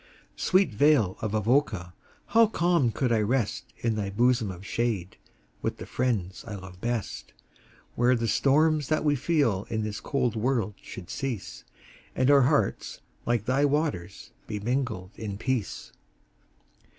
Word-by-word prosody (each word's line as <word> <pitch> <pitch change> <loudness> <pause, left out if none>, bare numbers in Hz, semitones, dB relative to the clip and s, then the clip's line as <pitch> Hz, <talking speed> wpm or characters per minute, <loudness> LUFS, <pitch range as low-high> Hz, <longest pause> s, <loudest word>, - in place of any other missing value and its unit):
Sweet 185 - +2
vale 115 -6 +4
of 110 -1 -2
Avoca! 110 -5 +1 0.4
how 230 0 +7
calm 170 - +2
could 125 +1 -1
I 115 - +3
rest 115 0 -1
In 115 -1 +2
thy 100 -2 -2
bosom 120 +1 +2
of 95 +1 -8
shade, 110 -6 -2 0.4
with - - -2
the - - -7
friends 105 -8 -2
I 105 - -5
love 95 -1 -11
best, 115 - -3 0.6
Where 125 +1 +3
the 115 -1 -1
storms 150 +4 +3
that 155 0 0
we 145 -1 +3
feel 130 - +1
in 110 -2 -1
this 105 -1 -4
cold 125 -4 -1
world 115 -1 0
should 90 - -9
cease, 130 -7 -5 0.5
And 130 +2 +3
our 140 -1 +7
hearts, 140 +3 +1 0.3
like 120 -3 +1
thy 130 +4 +2
waters, 140 - -1 0.2
be 105 - -3
mingled 115 -5 -2
in 105 -3 -4
peace. 125 -2 -3
120 Hz, 150 wpm, -27 LUFS, 105-140 Hz, 0.6 s, how